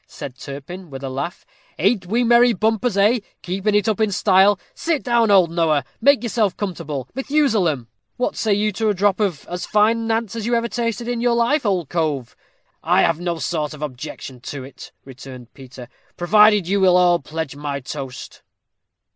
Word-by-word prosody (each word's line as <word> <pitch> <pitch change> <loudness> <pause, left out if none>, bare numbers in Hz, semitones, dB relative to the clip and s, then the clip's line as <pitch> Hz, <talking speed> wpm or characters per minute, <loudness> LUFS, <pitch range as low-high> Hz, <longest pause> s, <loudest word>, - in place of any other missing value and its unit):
said 130 -3 -8
Turpin, 145 +7 -9
with 135 -1 -8
a 135 - -4
laugh. 140 +7 -5 0.3
"Ain't 195 +1 +1
we 235 +6 +1
merry 240 0 +5
mumpers, 220 0 +1
eh? 215 +5 +4 0.2
Keeping 195 +3 -1
it 210 +1 +2
up 220 -1 0
in 215 -2 +2
style. 195 +1 +4
Sit 325 -5 -2
down, 235 -2 +2
old 185 -4 +5
Noah 160 -5 +1 0.2
make 280 +1 +4
yourself 220 -5 0
comfortable, 160 - -4
Methusalem." 225 - 0 0.3
"What 250 - -1
say 220 - -1
you 210 +1 +2
to 220 +2 -1
a 205 - +1
drop 200 +1 +1
of 190 -9 -1
as 180 0 -5
fine 225 +2 +2
Nantz 225 -1 -1
as 225 -1 -4
you 240 - +2
ever 235 0 0
tasted 235 0 -3
in 240 -1 -2
your 240 -1 +2
life, 235 +2 +1
old 180 -6 0
cove?" 150 -7 -1
said - - -26
Zoroaster. - - -40 0.2
"I - - +5
have 165 -1 +1
no 175 -1 -2
sort 155 -2 -3
of 150 - -8
objection 130 -1 -7
to 135 +2 -7
it," 135 - -12
returned 130 -2 -11
Peter, 130 -2 -12 0.3
"provided 210 +1 +4
you 200 +2 +1
will 180 -1 +5
all 175 -1 +4
pledge 155 -1 -5
my 145 -1 -4
toast." 135 -1 -8
190 Hz, 190 wpm, -20 LUFS, 150-225 Hz, 0.3 s, merry